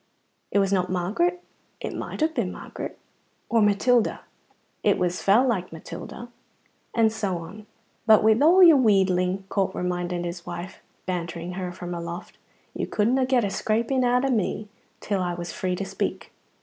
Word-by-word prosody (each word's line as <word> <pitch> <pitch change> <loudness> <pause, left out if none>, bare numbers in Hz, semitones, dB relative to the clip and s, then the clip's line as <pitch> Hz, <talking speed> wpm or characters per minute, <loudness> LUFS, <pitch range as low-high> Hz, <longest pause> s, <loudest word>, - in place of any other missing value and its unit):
It - - 0
was 195 0 +2
not 185 -1 +1
Margaret? 225 - 0 0.4
It - - -5
might - - -5
have 315 +1 +2
been 230 - -1
Margaret. - - -7 0.5
Or 230 -1 +3
Matilda? 215 +3 +2 0.6
It - - +3
was 180 0 -1
fell 225 +7 +4
like 190 -7 -1
Matilda. 165 +8 -8 0.7
And 225 -2 +3
so 200 -5 -2
on. 190 +6 -10 0.4
"But 215 -1 +7
wi' 220 - +6
a' 330 - +6
your 320 -4 +7
wheedling," 190 -5 +2
Corp 195 -2 0
reminded 180 -1 -2
his 175 0 -5
wife, 175 +2 -7 0.2
bantering 175 -1 -4
her 180 -1 -4
from 175 0 -6
aloft, 170 0 -7 0.3
"you - - -3
couldna 250 +5 +1
get 255 -3 +3
a 195 - -2
scraping 230 +6 0
out 250 +1 +2
o' 270 - +1
me 215 -2 -1 0.3
till 200 -2 -1
I 175 -1 -1
was 175 0 -6
free 185 -1 -2
to 195 - -4
speak." - - -4
195 Hz, 165 wpm, -25 LUFS, 180-235 Hz, 0.7 s, But